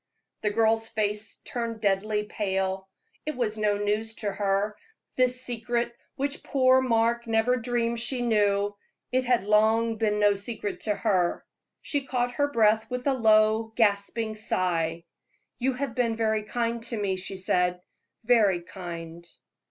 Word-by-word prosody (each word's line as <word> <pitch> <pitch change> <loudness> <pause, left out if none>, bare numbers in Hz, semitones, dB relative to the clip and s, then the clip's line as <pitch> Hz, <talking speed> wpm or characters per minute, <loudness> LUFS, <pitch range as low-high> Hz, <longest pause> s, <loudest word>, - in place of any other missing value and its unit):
The 210 - +1
girl's 225 +1 +2
face 210 -1 -1
turned 230 -2 -4
deadly 210 +1 +1
pale. 190 -2 -2 0.3
It 305 - -3
was 230 -4 -1
no 210 -1 +1
news 210 +2 -1
to 205 -2 -3
her 200 +1 0 0.4
this 255 0 +2
secret 240 0 -2 0.2
which 280 +1 -2
poor 260 -1 +4
Mark 235 -1 +1
never 225 +2 +2
dreamed 235 -1 -1
she 245 +1 -1
knew; 205 -3 +2 0.4
it 255 0 +1
had 245 -5 +2
long 220 +2 +3
been 210 -1 +1
no 205 -1 +5
secret 205 +1 -4
to 210 -2 +1
her. 185 -6 0 0.4
She 290 -2 -1
caught 245 -1 0
her 285 +4 0
breath 220 -2 +3
with 250 0 -4
a 280 - +3
low, 220 -1 +3
gasping 215 0 +1
sigh. 170 -6 -1 0.6
"You 260 +1 +1
have 260 -1 -3
been 235 -2 0
very 220 -1 0
kind 235 +1 -2
to 235 -1 -2
me," 195 -2 0
she 190 +1 -4
said 180 -1 +1 0.4
"very 210 -7 +3
kind." 170 -2 -8
220 Hz, 150 wpm, -27 LUFS, 205-235 Hz, 0.6 s, no